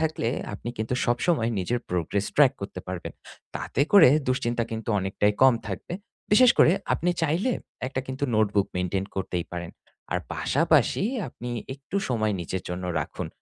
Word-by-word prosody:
থাকলে 155 -7 0 0.3
আপনি 110 - -7
কিন্তু 110 +3 -1
সবসময় 120 -1 +1
নিজের 105 +7 0
progress 90 +3 -1
track 140 -3 +6
করতে 100 -2 -6
পারবেন। 90 -2 -5 0.4
তাতে - - -3
করে 200 -8 +9 0.2
দুশ্চিন্তা 120 -2 0
কিন্তু 110 0 -5
অনেকটাই 95 +2 +1
কম 130 -2 +7
থাকবে। 100 - -5 0.4
বিশেষ 250 +3 +7
করে 165 - +7 0.2
আপনি 180 - 0
চাইলে 170 - +1 0.3
একটা 130 0 -2
কিন্তু 130 +2 -3
notebook 105 -2 +2
maintain 90 +1 -1
করতেই 90 -2 -2
পারেন। 85 -1 -5 0.4
আর - - +1 0.2
পাশাপাশি - - +2 0.3
আপনি 120 0 -8 0.3
একটু 140 +8 -6
সময় 110 -4 +1
নিজের 90 +2 -4
জন্য 90 +1 -4 0.2
রাখুন - - -6
115 Hz, 150 wpm, -26 LUFS, 95-135 Hz, 0.4 s, করে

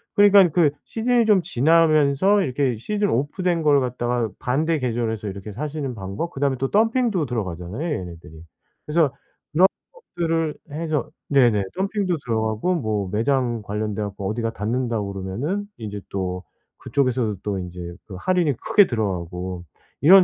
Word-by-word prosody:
그러니까 205 -2 +7
그 155 -1 +4 0.2
시즌이 235 +1 +1
좀 210 -4 +5
지나면서 160 +4 +4
이렇게 130 -1 0
시즌 205 - -1
오프 145 - -1
된 175 -3 +1
걸 145 -2 +5
갖다가 120 -2 -1
반대 155 +6 +1
계절에서 115 -4 -2
이렇게 100 +2 -7
사시는 140 +1 -4
방법 100 - -4
그다음에 135 -1 0
또 135 - 0
덤핑도 225 - +2
들어가잖아요, 95 - -4 0.2
얘네들이. 85 -3 -10 0.4
그래서 150 -2 +2 0.4
그런 180 +5 +6 0.5
것들을 165 -2 0 0.2
해서 155 -1 -2 0.2
네네. 120 -8 +4
덤핑도 195 -2 0
들어가고 110 +8 0
뭐 110 - -1
매장 120 0 +1
관련돼 105 0 -3
갖고 100 -1 -4
어디가 115 +1 -2
닫는다고 115 -2 -2
그러면은 120 - -3 0.3
제 100 0 -6
또 90 -1 -3 0.4
그쪽에서도 125 -6 0
또 100 -2 -2
인제 90 0 -7 0.3
그 95 - -8
할인이 180 -5 +2
크게 205 -3 +4
들어가고 90 -4 -3 0.4
이런 185 +5 +9
130 Hz, 345 characters per minute, -23 LUFS, 105-165 Hz, 0.5 s, 이런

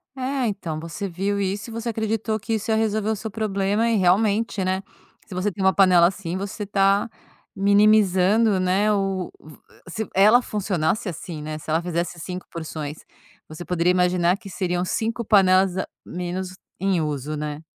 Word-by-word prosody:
É, 260 -1 -1
então 170 -7 -4
você 170 +5 -5
viu 195 +3 -2
isso 200 +4 -2
e - - -8
você 230 +1 -3
acreditou 220 0 -1
que 225 +3 -3
isso 220 +1 -1
ia - - +3
resolver 220 -1 0
o 220 - +1
seu 220 +2 -6
problema. 205 +1 0
E 230 - +2
realmente, 205 +3 +2
né. 190 +1 -1 0.4
Se 195 - -11
você 190 +3 -1
tem 195 0 -5
uma 190 0 +4
panela 180 -3 +6
assim 185 -1 -4
você 200 +2 -5
está 200 +2 +2 0.5
minimizando, 200 0 +4
né, 190 +3 +2
o 195 -2 -1
v 155 -1 -14 0.3
se 220 +4 -4
ela 215 +6 +6
funcionasse, 200 0 -1
assim, 160 -1 -7
né, 155 0 -5
se 155 - -11
ela 160 +2 +2
fizesse 170 0 -3
5 180 +2 -6
porções, 155 -2 -6 0.5
você 155 +3 -9
poderia 180 0 +1
imaginar 180 0 +2
que 205 - -13
seriam 180 -1 -1
5 230 +4 -2
panelas 190 -3 +4
a 190 - -2 0.2
menos 180 +1 -5 0.2
em 190 -3 +1
uso, 150 0 -3
né? 150 0 -4
195 Hz, 175 wpm, -23 LUFS, 175-210 Hz, 0.5 s, panela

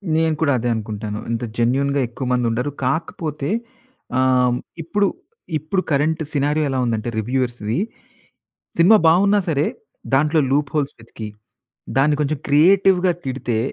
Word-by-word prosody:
నేను 160 -1 +2
కూడా 145 -3 +3
అదే 120 +1 -1
అనుకుంటాను. 105 -1 -4
ఇంత 115 +1 -2
జెన్యూన్‌గా 135 +4 +1
ఎక్కువ 125 +3 -6
మంది 125 -1 +1
ఉండరు. 125 +5 -1
కాకపోతే 150 0 -2 0.7
ఆహ్, 125 -1 +3 0.3
ఇప్పుడు 200 +5 +1 0.5
ఇప్పుడు 155 +6 -1
కరెంట్ 155 +3 +1
సినారియో 150 +2 +1
ఎలా 135 - -1
ఉందంటే 115 0 -1
రివ్యూవర్స్‌వి, 120 - -1 1.0
సినిమా 185 +6 +7
బావున్నా 200 +5 +4
సరే 145 0 +1 0.5
దాంట్లో 150 +3 +3
లూప్ 145 0 +1
హోల్స్ 145 -1 -1
వెతికి, 110 -1 -9 0.7
దాన్ని 145 +2 +4
కొంచెం 150 0 -1
క్రియేటివ్‌గా 185 +4 +4
తిడితే 130 -3 -2
140 Hz, 125 wpm, -21 LUFS, 125-160 Hz, 1.0 s, సినిమా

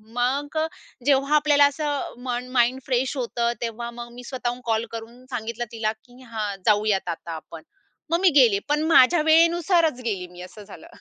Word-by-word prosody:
मग 275 +5 -1 0.5
जेव्हा 275 +1 +3
आपल्याला 290 -1 +5
असं 290 -1 -3
मन 250 0 -3
माइंड 250 +1 +2
फ्रेश 255 +2 0
होतं 235 -1 -1
तेव्हा 235 0 -4
मग 240 0 -8
मी 245 +1 -10
स्वतःहून 245 -1 -4
कॉल 225 0 0
करून 230 +2 -9
सांगितलं 235 0 -4
तिला 220 -1 -1
की 250 +1 -18
"हां 215 -4 -4
जाऊयात 205 -3 +2
आता 170 0 -5
आपण" 160 0 -9 0.5
मग 335 - +3
मी 380 - +6
गेले 215 -5 +4
पण 300 +1 +1
माझ्या 310 +4 +6
वेळेनुसारच 330 -3 +3
गेली 190 -5 -2
मी 180 0 -13
असं 185 +4 -11
झालं. 195 -5 -13
245 Hz, 170 wpm, -24 LUFS, 220-285 Hz, 0.5 s, मी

